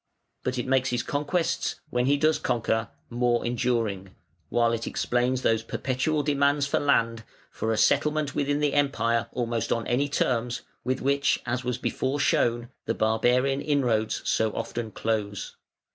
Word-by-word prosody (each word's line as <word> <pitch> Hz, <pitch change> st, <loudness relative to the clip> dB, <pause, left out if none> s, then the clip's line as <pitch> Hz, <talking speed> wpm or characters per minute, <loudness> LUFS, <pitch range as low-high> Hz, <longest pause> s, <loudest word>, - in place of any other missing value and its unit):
But 130 Hz, 0 st, -2 dB
it 125 Hz, -, -2 dB
makes 130 Hz, 0 st, +2 dB
his 120 Hz, -1 st, -1 dB
conquests, 165 Hz, +4 st, -1 dB, 0.2 s
when 125 Hz, +1 st, +1 dB
he 145 Hz, +1 st, +4 dB
does 155 Hz, +2 st, +2 dB
conquer, 115 Hz, -1 st, 0 dB, 0.2 s
more 120 Hz, 0 st, +1 dB
enduring, 115 Hz, -6 st, -1 dB, 0.3 s
while 120 Hz, -1 st, +2 dB
it 115 Hz, 0 st, -2 dB
explains 125 Hz, +1 st, 0 dB
those 115 Hz, -1 st, +2 dB
perpetual 135 Hz, +6 st, -1 dB
demands 140 Hz, 0 st, +2 dB
for 140 Hz, -, +1 dB
land, 115 Hz, -5 st, +1 dB, 0.3 s
for 110 Hz, -, -2 dB
a 110 Hz, -, 0 dB
settlement 150 Hz, +2 st, +2 dB
within 145 Hz, +1 st, 0 dB
the 145 Hz, -1 st, +1 dB
Empire, 115 Hz, -5 st, +1 dB
almost 115 Hz, -2 st, -2 dB
on 115 Hz, -, 0 dB
any 140 Hz, +4 st, +1 dB
terms, 125 Hz, -3 st, 0 dB, 0.2 s
with 130 Hz, +1 st, -1 dB
which, 140 Hz, +1 st, +2 dB
as 125 Hz, +1 st, -2 dB
was 125 Hz, -1 st, -1 dB
before 130 Hz, +2 st, -2 dB
shown, 120 Hz, -3 st, +1 dB, 0.2 s
the -, -, -1 dB
barbarian 125 Hz, +5 st, +2 dB
inroads 120 Hz, -7 st, 0 dB
so 110 Hz, -, +2 dB
often 115 Hz, -2 st, -4 dB
close. 105 Hz, -2 st, -3 dB
125 Hz, 155 wpm, -26 LUFS, 115-140 Hz, 0.3 s, he